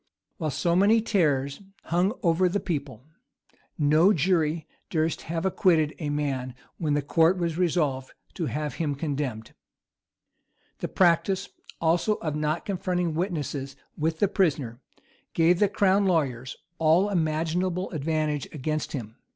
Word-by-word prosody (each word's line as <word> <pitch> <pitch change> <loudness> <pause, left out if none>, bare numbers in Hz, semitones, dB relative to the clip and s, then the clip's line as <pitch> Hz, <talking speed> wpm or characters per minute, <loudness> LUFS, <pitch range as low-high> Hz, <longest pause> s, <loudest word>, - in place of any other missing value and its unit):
While 160 -4 -2
so 170 +5 0
many 205 +5 +5
terrors 150 -10 0 0.2
hung 180 +5 +1
over 175 +1 +3
the 205 +3 0
people, 140 - -4 0.7
no 155 +6 +4
jury 160 -2 +1 0.2
durst 160 0 0
have 165 +1 -2
acquitted 165 -5 +2
a 150 -3 -3
man 135 -4 -2 0.2
when 150 -3 0
the 145 - 0
court 165 +5 +3
was 170 -2 -1
resolved 155 -7 0 0.2
to 170 -5 -3
have 150 0 -3
him 145 -3 0
condemned. 140 -7 -4 1.3
The - - -2
practice, 190 +2 +2 0.3
also, 170 +6 +2
of 155 -6 -4
not 150 +2 -1
confronting 180 -3 -1
witnesses 150 -6 -3 0.2
with 160 +1 -1
the 205 - +3
prisoner, 140 - 0 0.5
gave 170 +2 +4
the 205 - +4
crown 200 0 +3
lawyers 130 -8 -1 0.2
all 165 +5 +4
imaginable 170 +2 -1
advantage 155 -2 -1
against 155 +1 -3
him. 115 -4 -6
160 Hz, 135 wpm, -26 LUFS, 145-180 Hz, 1.3 s, many